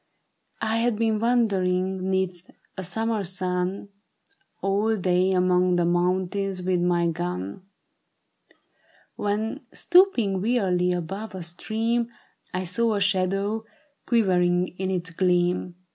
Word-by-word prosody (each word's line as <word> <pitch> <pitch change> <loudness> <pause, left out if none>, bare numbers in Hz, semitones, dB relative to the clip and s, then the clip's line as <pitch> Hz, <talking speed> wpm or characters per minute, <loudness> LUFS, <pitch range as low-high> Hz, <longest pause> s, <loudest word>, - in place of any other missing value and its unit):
I 220 +1 +1
had 235 0 +1
been 220 -1 +1
wandering 190 -5 +1
'neath 185 -2 -2 0.3
a 190 - -5
summer's 210 0 -1
sun 185 +1 -2 0.7
All 210 +3 +1
day 185 0 +2
among 180 -1 +3
the 175 -1 +2
mountains 185 +2 0
with 180 -1 +1
my 175 -1 +2
gun, 165 - -4 1.5
When, 215 +6 -2
stooping 245 - +3
wearily 190 -6 +1
above 190 +5 -4
a 185 - -5
stream, 225 +7 -1 0.4
I 185 +1 -2
saw 215 +5 +1
a - - 0
shadow 200 +2 0 0.4
quivering 180 -6 +2
in 190 0 -1
its 180 -2 -2
gleam. 180 0 +1
190 Hz, 115 wpm, -25 LUFS, 180-215 Hz, 1.5 s, among